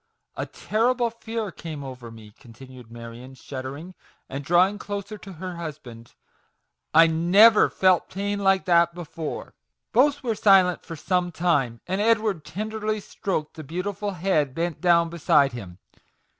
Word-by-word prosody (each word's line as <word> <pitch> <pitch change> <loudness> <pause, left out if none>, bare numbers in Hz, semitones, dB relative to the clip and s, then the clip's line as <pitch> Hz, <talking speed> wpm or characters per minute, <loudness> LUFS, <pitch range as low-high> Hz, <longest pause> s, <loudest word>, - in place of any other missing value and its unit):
A - - -4
terrible 235 +2 0
fear 225 -2 -5
came 155 -4 -8
over 125 -3 -9
me," 110 -2 -13
continued 125 0 -14
Marion, 120 +3 -10
shud 130 0 -8
dering, 150 +8 -8 0.4
and 135 +1 -5
drawing 180 +6 +3
closer 205 +1 -5
to 195 0 -10
her 180 +1 -7
husband 135 -8 -9 0.4
" - - -53
I - - +8
never 180 +7 +5
felt 185 -2 +2
pain 200 +1 -3
like 195 -1 +2
that 170 -1 +3
before! 165 -2 -6 0.2
" - - -59
Both 285 +3 +3
were 235 -3 0
silent 195 -4 +4
for 165 - -8
some 180 +2 -1
time 145 -10 0
j 180 - -5
and 195 - 0
Edward 215 -6 +1
tenderly 215 +4 -3
stroked 190 -6 -4
the 155 - -9
beautiful 185 +7 -4
head 165 -7 0
bent 170 -1 -3
down 170 -2 +4
beside 155 -4 +3
him. 95 -7 -9
175 Hz, 155 wpm, -24 LUFS, 140-200 Hz, 0.4 s, I